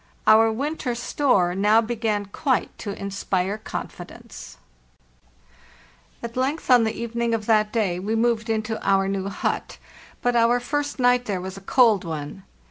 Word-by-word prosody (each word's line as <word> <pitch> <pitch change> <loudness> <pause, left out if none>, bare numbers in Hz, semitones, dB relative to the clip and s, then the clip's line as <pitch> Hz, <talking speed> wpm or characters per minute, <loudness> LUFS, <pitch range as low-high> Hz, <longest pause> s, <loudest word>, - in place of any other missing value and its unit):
Our 220 +1 +6
winter 265 0 -3
store 235 -7 +1
now 210 +4 +4
began 220 -3 -1
quite 255 +6 -1
to 200 -2 -6
inspire 195 0 -2
confi - - -6
dence, - - -12 1.7
At 235 0 -6
length, 265 +3 -1
on 245 -2 +6
the 220 - -2
evening 235 0 -1
of 215 -2 -5
that 215 -1 +2
day, 195 -6 0
we 210 +4 -2
moved 230 -1 0
into 220 0 -2
our 195 0 +2
new 195 0 -2
hut; 200 - -3 0.5
but 245 0 +1
our 235 +1 +4
first 290 +3 -3
night 245 -1 +3
there 200 -4 -2
was 190 +1 -6
a 195 - -10
cold 220 -1 +3
one. 160 +1 -6
220 Hz, 155 wpm, -23 LUFS, 200-240 Hz, 1.7 s, Our